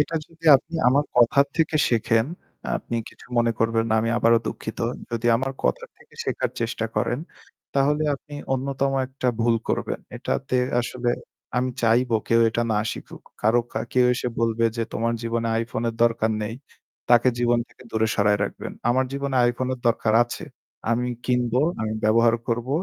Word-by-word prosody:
এটা 155 +3 0
যদি 165 0 -20
আপনি 160 +5 -11
আমার 140 +3 +3
কথার 140 +4 +5
থেকে 160 -1 +2
শিখেন, 115 0 +2 0.5
আপনি 115 - -5
কিছু - - -16
মনে 115 0 +3
করবেন 115 0 +2
না। - - +3
আমি 115 +1 0
আবারো 115 0 +5
দুঃখিত। 110 - -5 0.3
যদি 115 0 -2
আমার 135 +3 -2
কথার 60 - 0
থেকে - - -21
শেখার - - -1
চেষ্টা 115 -1 -1
করেন। 120 +3 0 0.6
তাহলে 145 +2 +2
আপনি 145 +2 -11 0.2
অন্যতম 135 +1 -1
একটা 130 -1 -2
ভুল 115 0 +3
করবেন। - - -1 0.2
এটাতে 135 -2 -2 0.2
আসলে 120 0 -2 0.5
আমি 125 +1 +1
চাইবো 115 +1 +3
কেউ 115 0 +4
এটা 115 +1 -1
না 105 - +2
শিখুক। - - -10 0.2
কারো 115 +3 +4
কা - - -2
কেউ 125 -1 +4
এসে 125 - -2
বলবে 115 0 +1
যে 115 - 0
তোমার 115 +1 0
জীবনে 115 0 -1
আইফোনের 115 0 -2
দরকার 115 -1 +2
নেই। 105 +2 -4 0.5
তাকে 120 +1 +6
জীবন 120 0 +3
থেকে - - -18
দূরে 110 0 +1
সরায় 105 0 +3
রাখবেন। - - -6 0.2
আমার 130 +2 +2
জীবনে 140 -1 -2
আইফোনের 125 +2 -1
দরকার 110 -1 +2
আছে। 120 +7 -7 0.5
আমি 120 +1 +1 0.2
কিনবো, 125 0 +1 0.2
আমি 110 0 -1
ব্যবহার 115 +2 +4
করব। 120 +2 -1
120 Hz, 165 wpm, -24 LUFS, 115-130 Hz, 0.6 s, তাকে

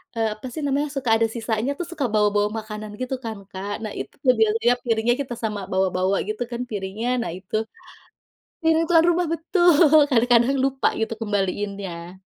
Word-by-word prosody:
eee, 225 -1 +1
apa 215 +4 -13
sih 310 - -5
namanya, 285 +2 0
suka 260 -4 -2
ada 225 0 +2
sisanya 225 +3 -1
tuh 350 - -2
suka 290 -6 -2
bawa-bawa 210 -1 +3
makanan 215 0 -7
gitu 255 +1 -2
kan 220 -2 -4
Kak, 195 +2 -5
nah 215 - -4
itu - - -6
tuh 255 -1 +5
biasanya 225 +3 +3
piringnya 230 +1 +2
kita 250 -3 -5
sama 210 -2 -2
bawa-bawa 190 0 +1
gitu 215 +3 -4
kan 240 +1 -3
piringnya. 210 +3 -3
Nah 230 - -3
itu 190 +3 -7 1.1
mirip 325 0 +4
tuan 330 -1 +5
rumah 345 0 +1
betul, 345 +2 +3 0.4
kadang-kadang 245 +1 +4
lupa 270 0 0
gitu 225 - -1
kembaliinnya. 195 -4 -3
225 Hz, 170 wpm, -23 LUFS, 205-260 Hz, 1.1 s, tuh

